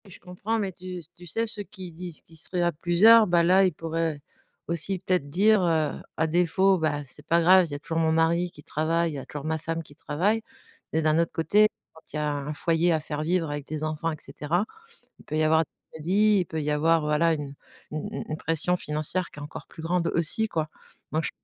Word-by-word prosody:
Je 180 - -12
comprends 195 +5 -3
mais 200 -3 -1
tu 180 0 -7 0.2
tu 175 0 -12
sais, 225 +8 0
ceux 215 -2 -3
qui 185 -2 -10
disent 175 0 -8
qui 165 - -19
seraient 175 +3 -2
à 175 - +3
plusieurs, 205 +8 +6
bah 175 -1 +4
là, 185 +3 +5
ils 185 - +2
pourraient 165 -1 -2 0.5
aussi 170 +3 -1
peut-être 180 -4 0
dire, 200 +7 +4
heu: 160 -3 +1 0.2
«À 160 - +2
défaut, 180 +3 +3
bah 150 -2 0
c'est 145 +2 -17
pas 170 - +4
grave, 180 +2 +6
il - - -13
y - - -3
a - - -5
toujours 165 +2 -2
mon 160 -1 +2
mari 165 +2 +2
qui 150 -3 -15
travaille, 165 +3 0
il - - -7
y - - -4
a - - -8
toujours 145 0 -7
ma 160 0 -1
femme 165 +1 -3
qui 145 - -17
travaille» 180 +9 0 0.5
mais 160 - +2
d'un 155 +1 +3
autre 170 - +1
côté, 210 +6 +4 0.3
quand 160 - -16
il - - -5
y - - -1
a 150 0 0
un 145 +1 -4
foyer 165 +3 +1
à 160 - +2
faire 150 -1 -4
vivre 165 0 0
avec 145 -1 -4
des 155 0 -4
enfants 155 +1 -1
et 155 - -5
cetera. 170 +7 -2 0.5
Il - - -17
peut 155 - -4
y 155 - +2
avoir 160 +1 +4
des - - -38 0.2
crédits, 200 +7 +3
il - - 0
peut 160 -1 -3
y 150 - -1
avoir, 160 +2 +3
voilà, 150 +2 +2
une 145 -2 -5 0.4
u 150 - -5
u 155 - -4
une 155 - -2
pression 165 +3 0
financière 155 +3 -2
qui - - -13
est - - -7
encore 145 - -8
plus 160 - -11
grande 170 +1 0
aussi 170 +7 +1
quoi. 155 -6 -2 0.4
Moi 155 - 0
je - - -2
165 Hz, 245 wpm, -26 LUFS, 155-180 Hz, 0.5 s, plusieurs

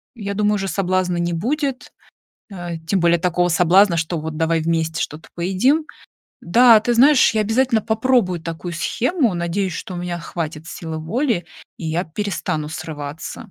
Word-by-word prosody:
я 200 -3 -4
думаю, 210 0 +2
уже 195 -1 -2
соблазна 185 -2 0
не 170 0 -1
будет, 270 - -2 0.6
э, 175 -3 -5
тем 190 +2 +1
более 170 0 +3
такого 175 0 +1
соблазна, 180 +2 +4
что 165 0 -2
вот 155 0 -5
давай 165 0 +1
вместе 160 0 -1
что-то 155 +2 -7
поедим. 195 - +1 0.6
Да, 230 +5 +6
ты 240 +2 0
знаешь, 260 0 +5
я 215 - +2
обязательно 225 +2 +2
попробую 220 -6 +1
такую 165 +1 -6
схему, 245 - 0
надеюсь, 175 +2 -1
что 185 - -6
у - - -5
меня 175 -1 -4
хватит 160 -1 -5
силы 160 -1 -6
воли 210 - -1 0.3
и 165 - -5
я 165 +3 -1
перестану 160 -4 -3
срываться. 155 +6 -7
180 Hz, 160 wpm, -20 LUFS, 165-220 Hz, 0.6 s, Да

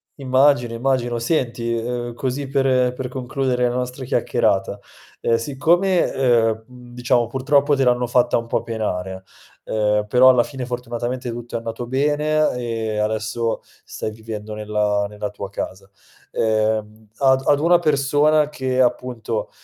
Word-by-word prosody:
immagino, 130 -3 +2
immagino. 120 -1 0
Senti, 120 -3 -1
uhm, 120 +1 -3
così 135 +3 -3
per, 135 0 0
ehm, 125 -1 +2
per 125 0 -5
concludere 130 -1 -1
la 120 - -3
nostra 125 +1 -4
chiacchierata. 110 -5 0 0.4
Ehm, 115 - +2
siccome, 170 +9 +2
ehm, 115 -4 +2
mhmm, 125 -1 -14
diciamo 120 -1 +1
purtroppo 140 +3 +2
te 135 - +1
l'hanno 125 0 +2
fatta 120 0 +2
un 115 0 -4
po' - - -1
penare, 95 -4 -4 0.4
uhm, 105 -1 +1
però 125 +4 +6
alla 125 -2 +5
fine 130 -1 -6
fortunatamente 120 0 -4
tutto 120 0 -7
è - - +2
andato 115 +1 -5
bene 150 +3 +1
e 115 -3 -3
adesso 110 +2 -1 0.2
stai 110 - -5
vivendo 110 -1 -7
nella 105 -1 0
nella 105 0 -5
tua 100 -1 -7
casa. 95 -1 -6 0.4
Ehm, 110 -1 -1
ad 130 -1 +4
ad 145 - +4
una 170 +3 +4
persona 150 0 +2
che 130 -3 -1
appunto, 120 -2 -1
120 Hz, 145 wpm, -21 LUFS, 110-130 Hz, 0.4 s, però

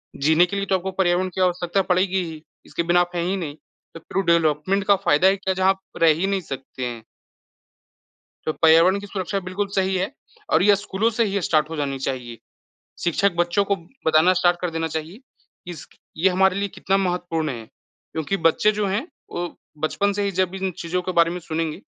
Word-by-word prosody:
जीने 160 +5 +4
के 180 - -5
लिए 200 - -1
तो 190 - +1
आपको 190 +1 -2
पर्यावरण 180 +1 +2
की 190 - -1
आवश्यकता 180 +1 +1
पड़ेगी 185 0 +1
ही 160 -2 -8 0.2
इसके 170 - -3
बिना 175 +1 +3
आप 175 0 -2
हैं 170 - 0
ही 185 +3 0
नहीं। 150 -5 -5 0.4
तो 165 - -9
फिर 195 +4 -3
डेवलपमेंट 170 +3 +2
का 200 - +6
फ़ायदा 185 -3 +3
ही 195 +1 +3
क्या 190 - -2
है - - -1
जहाँ 190 0 +3
आप 190 0 +1 0.2
रह 165 - +7
ही 170 +5 -1
नहीं 195 -1 0
सकते 135 -4 -6
हैं। 120 -2 -6 1.4
तो 155 - +1
पर्यावरण 165 +5 +5
की 205 - -9
सुरक्षा 195 0 -3
बिल्कुल 185 +3 -3
सही 190 -1 +1
है 190 +8 -2 0.4
और - - +4
ये 205 0 +5
स्कूलों 205 +2 -1
से 230 - +4
ही 200 -1 -1
स्टार्ट 155 -2 +1
हो 165 - -4
जानी 140 -2 -2
चाहिए। 125 -3 -4 0.7
शिक्षक 195 +4 +2
बच्चों 175 +3 +2
को 200 0 0 0.3
बताना 160 +3 +5
स्टार्ट 175 -1 +2
कर 180 - -2
देना 165 0 -2
चाहिए 160 +6 -5
कि 255 -8 -17
इसकी 170 - -11 0.2
ये 190 - +6
हमारे 190 +1 +3
लिए 200 0 -1
कितना 195 +1 0
महत्वपूर्ण 175 -4 -1
है 115 -4 -6 0.5
क्योंकि 160 +5 -2
बच्चे 210 +6 +2
जो 205 - +1
हैं 205 - -1 0.2
वो 175 0 -3 0.3
बचपन 200 +6 0
से 205 - -2
ही 200 - 0
जब 185 0 0
इन 190 0 -2
चीज़ों 180 +2 -2
के 185 +1 -3
बारे 170 -1 +4
में 180 +1 -5
सुनेंगे 160 +1 -3
180 Hz, 215 wpm, -23 LUFS, 160-195 Hz, 1.4 s, रह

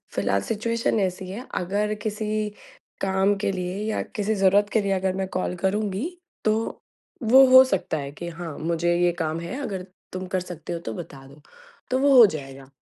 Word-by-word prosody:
फ़िलहाल 100 0 +1
सिचुएशन 225 - -1
ऐसी 185 -1 -2
है, 230 +7 -6
अगर 205 +4 0
किसी 215 0 -2 0.5
काम 195 +1 +2
के 195 0 -1
लिए 180 0 -3
या - - -1
किसी 215 0 0
ज़रूरत 200 +1 +4
के 220 - +3
लिए 200 - -1
अगर 190 -1 +1
मैं 190 -1 -2
कॉल 185 0 -1
करूँगी, 200 - -1 0.4
तो 220 +1 0 0.4
वो 260 +4 +8
हो 260 0 +10
सकता 195 -10 -1
है 140 -1 -5
कि 170 +4 -7
हाँ 165 -2 -7
मुझे 170 +1 0
ये 175 0 +3
काम 160 0 -1
है, 175 +11 -5
अगर 190 -8 -4 0.3
तुम 185 0 -4
कर 185 0 -1
सकते 175 -2 -7
हो 170 - -3
तो 115 -9 -6
बता 135 +3 -9
दो, 140 +2 -16 0.5
तो 255 - +2
वो 275 -1 +5
हो 235 - +11
जाएगा, 135 -6 -5
190 Hz, 190 wpm, -24 LUFS, 170-215 Hz, 0.5 s, हो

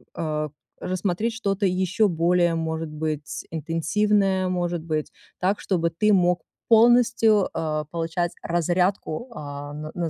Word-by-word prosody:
э, 155 -1 -2 0.3
рассмотреть 185 +5 -1
что-то 200 -2 -1
ещё 190 +3 +2
более, 170 0 +2
может 160 0 -3
быть, 155 -1 -4
интенсивное, 185 +5 +1
может 175 -2 -1
быть, 155 -2 -2 0.3
так, 190 +3 +1
чтобы 170 -3 0
ты 210 +6 +2
мог 180 -2 +3 0.3
полностью, 230 -3 +5
э, 155 -1 -2
получать 170 +1 -1
разрядку, 175 +5 0
а, 145 -2 -7
на 155 +1 -6
на 170 -2 -1
175 Hz, 125 wpm, -24 LUFS, 160-195 Hz, 0.3 s, полностью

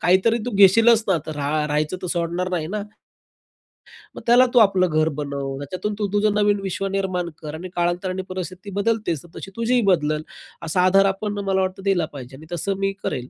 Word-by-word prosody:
काहीतरी 190 +6 +3
तू - - -1
घेशीलच 225 +4 +6
ना? 190 - +4
आता 160 -1 -4
रा 150 +1 -1
राहायचं 150 +3 -1
तर 180 - -3
सोडणार 175 +1 -2
नाही 170 -4 -1
ना?" 210 - -2 1.3
"मग - - -8
त्याला 245 +2 +7
तू 245 - +6
आपलं 190 -4 +4
घर 155 0 +2
बनव. 140 -2 -4
त्याच्यातून 185 +9 -4
तू, 205 - 0
तुझं 205 0 +2
नवीन 205 -1 +2
विश्व 195 +1 -3
निर्माण 185 -3 -1
कर 150 -2 -6
आणि 175 +4 -7
काळांतराने 175 +2 -1
परिस्थिती 185 +2 -6
बदलतेच. 210 -8 0
तर 175 - -16
तशी 195 - -8
तुझीही 235 +1 +1
बदलेल." 155 -3 +1 0.4
असा 165 +3 +1
आधार 195 +1 +5
आपण 205 +1 -2
मला 190 -1 +1
वाटतं, 190 +1 -3
दिला 190 -5 +2
पाहिजे 130 -1 -9
आणि 155 - -13
तसं, 195 +4 -2
मी 195 0 +1
करेल. 125 0 -3
185 Hz, 195 wpm, -22 LUFS, 160-200 Hz, 1.3 s, त्याला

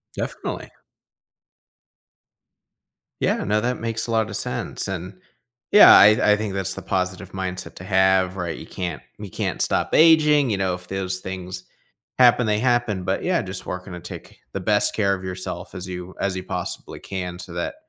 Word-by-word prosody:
Definitely. - - -5 2.5
Yeah. - - +1
No, 105 +1 +1
that 125 +2 -1
makes 115 0 -3
a - - -3
lot 110 -1 +1
of 105 - -6
sense. - - -3
And, 90 0 -5 0.6
yeah, 210 - +10
I 105 0 +6
I - - +2
think 105 -2 -3
that's 95 -1 -1
the - - -6
positive 95 -1 -3
mindset 95 -1 -5
to - - -10
have, 95 -1 +3
right? 90 -3 -4
You - - -9
can't 85 -4 -5 0.2
you 105 -2 -7
can't - - -3
stop - - 0
aging. 150 -4 +5
You 105 - 0
know 95 -1 0
if 90 0 -12
those 95 -1 -2
things 95 -1 -6 0.6
happen, 125 -1 +6
they 105 0 +1
happen, 120 -5 +1
but 95 +1 -1
yeah, 180 -1 +1
just 95 -2 -7
working 90 0 -6
to 90 - -6
take 90 - -10
the - - -2
best - - +2
care 100 -2 +2
of 95 - -10
yourself 95 0 -6
as 90 0 -6
you 90 0 -7
as 100 -2 0
you 95 - -4
possibly - - -5
can 90 -2 -5
so 90 - -9
that 85 - -3
95 Hz, 180 wpm, -23 LUFS, 90-110 Hz, 2.5 s, yeah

